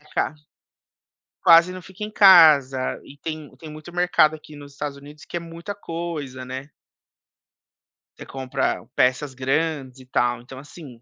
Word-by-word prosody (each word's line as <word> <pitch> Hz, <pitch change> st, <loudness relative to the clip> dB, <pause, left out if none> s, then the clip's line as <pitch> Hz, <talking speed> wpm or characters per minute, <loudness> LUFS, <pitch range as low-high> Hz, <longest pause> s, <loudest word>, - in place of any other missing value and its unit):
ca 150 Hz, +1 st, -3 dB, 1.1 s
Quase 170 Hz, +2 st, +7 dB
não 185 Hz, 0 st, -8 dB
fica 190 Hz, +3 st, -10 dB
em 210 Hz, -, -5 dB
casa, 155 Hz, -10 st, +6 dB
e 145 Hz, -, -15 dB
tem 155 Hz, -2 st, -7 dB
tem 155 Hz, +4 st, -11 dB
muito 155 Hz, +3 st, -11 dB
mercado 175 Hz, -3 st, +3 dB
aqui 155 Hz, -1 st, -14 dB
nos 145 Hz, -1 st, -12 dB
Estados 140 Hz, 0 st, -5 dB
Unidos 145 Hz, +2 st, -14 dB
que 175 Hz, -, -5 dB
é -, -, -2 dB
muita 170 Hz, +4 st, -8 dB
coisa, 165 Hz, -8 st, -6 dB
né. 130 Hz, +3 st, -7 dB, 1.5 s
Você -, -, -9 dB
compra 130 Hz, -1 st, -3 dB
peças 130 Hz, +2 st, +1 dB
grandes 135 Hz, 0 st, -2 dB
e -, -, -15 dB
tal, 120 Hz, -1 st, 0 dB
então 130 Hz, +2 st, -11 dB
assim, 140 Hz, -4 st, -13 dB
150 Hz, 155 wpm, -23 LUFS, 130-165 Hz, 1.5 s, Quase